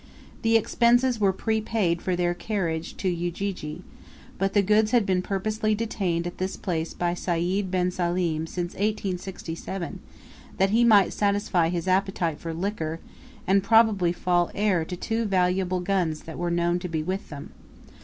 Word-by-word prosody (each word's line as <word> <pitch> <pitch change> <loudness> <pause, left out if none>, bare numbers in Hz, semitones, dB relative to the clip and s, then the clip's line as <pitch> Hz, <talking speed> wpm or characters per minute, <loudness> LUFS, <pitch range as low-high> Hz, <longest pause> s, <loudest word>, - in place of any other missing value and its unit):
The 225 0 +4
expenses 240 +2 +3
were 200 -2 +4
prepaid 215 -4 0
for 185 - -1
their 175 0 +1
carriage 175 -4 -3
to 190 - -2
Ujiji, 175 -1 -3 0.6
but 195 +1 0
the 205 - +5
goods 215 +2 +3
had 240 -3 +3
been 185 -1 +1
purposely 215 +3 -1
detained 190 -6 -1
at 175 - -6
this 185 +1 -2
place 165 -4 -3
by 175 0 0
Sayd 180 +3 -1
bin 180 -1 +1
Salim 175 -3 -1
since 175 +1 -4
1867 190 -3 -4 0.6
that 195 +1 +2
he 230 +2 +4
might 210 -5 +5
satisfy 200 -5 +1
his 170 0 -3
appetite 185 -4 0
for 165 - -5
liquor, 165 -2 -3 0.5
and 195 +2 +4
probably 210 -4 +4
fall 175 -1 +1
heir 200 -5 +2
to 180 - -5
two 225 +5 -2
valuable 185 -1 +1
guns 180 -4 0
that 160 - -9
were 175 0 -1
known 170 +1 +1
to 180 - -5
be 160 -2 -2
with 190 +4 -4
them. 145 -2 -8
185 Hz, 160 wpm, -26 LUFS, 175-205 Hz, 0.6 s, the